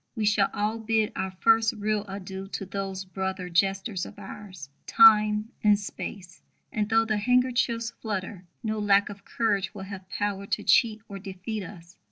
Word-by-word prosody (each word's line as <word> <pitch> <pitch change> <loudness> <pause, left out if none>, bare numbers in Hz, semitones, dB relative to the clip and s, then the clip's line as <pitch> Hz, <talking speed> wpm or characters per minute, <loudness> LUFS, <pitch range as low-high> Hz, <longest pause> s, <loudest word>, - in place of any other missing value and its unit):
We 220 -2 -1
shall 205 -1 +3
all 210 +2 -1
bid 220 -1 +1
our 190 - -2
first 225 +4 +3
real 210 0 -1
adieu 195 0 -7
to 195 - -3
those 195 0 -4
brother 190 -1 -4
jesters 195 +2 0
of - - -9
ours, 195 -6 -9 0.2
Time; 215 0 +6
and 210 -1 +5
Space; 190 -3 -7 0.3
and 210 0 -1
though 225 0 +4
the 215 -1 0
handkerchiefs 240 0 +1
flutter, 195 -3 -4 0.2
no 220 -1 -2
lack 200 -1 +3
of 200 -1 -10
courage 205 -3 -1
will 190 - -6
have 190 -1 -9
power 200 -1 -2
to - - -1
cheat 220 -2 +3
or 200 -2 -7
defeat 195 +3 -5
us. 175 -1 -12
205 Hz, 170 wpm, -27 LUFS, 190-220 Hz, 0.3 s, Time